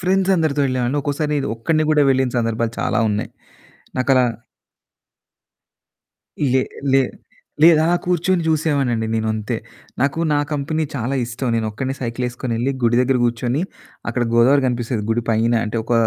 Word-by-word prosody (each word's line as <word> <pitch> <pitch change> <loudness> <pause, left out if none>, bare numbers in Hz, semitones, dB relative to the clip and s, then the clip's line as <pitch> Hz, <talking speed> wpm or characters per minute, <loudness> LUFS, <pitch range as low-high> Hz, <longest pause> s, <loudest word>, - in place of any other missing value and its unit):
Friends 190 +1 +1
అందరితో 155 -4 +1
వెళ్ళేవాన్ని. 130 +2 0
ఒక్కోసారి 150 +1 -1 0.2
ఒక్కడిని 155 +7 0
గూడా 150 -1 +4
వెళ్ళిన 130 -1 +2
సందర్భాలు 115 0 -1
చాలా - - 0
ఉన్నాయి. 105 0 -2 0.7
నాకలా 130 0 +3 2.3
లే 130 - +4 0.3
లే 135 - +6 0.6
లేదలా 160 -1 +6 0.2
కూర్చొని 180 0 +1
చూసేవాడ్నండి 140 -8 +1
నేనంతే. 110 -1 -1 0.4
నాకు 140 +4 +1
నా 145 - +3
కంపెనీ 155 +2 -1
చాలా 125 +1 -2
ఇష్టం. 120 +2 -4
నేనొక్కడనే 115 +4 -2
సైకిలేసుకొనెళ్ళి 120 0 -2
గుడి 120 0 +3
దగ్గర 130 +1 +2
కూర్చొని 120 +3 0 0.5
అక్కడ 120 +1 -1
గోదావరి 130 +4 +5
కనిపిస్తేది 120 -2 -2
గుడి 115 +1 +1
పైన, 115 +1 +2
అంటే 110 +2 -4
ఒక 120 - -3
130 Hz, 125 wpm, -20 LUFS, 115-150 Hz, 2.3 s, లే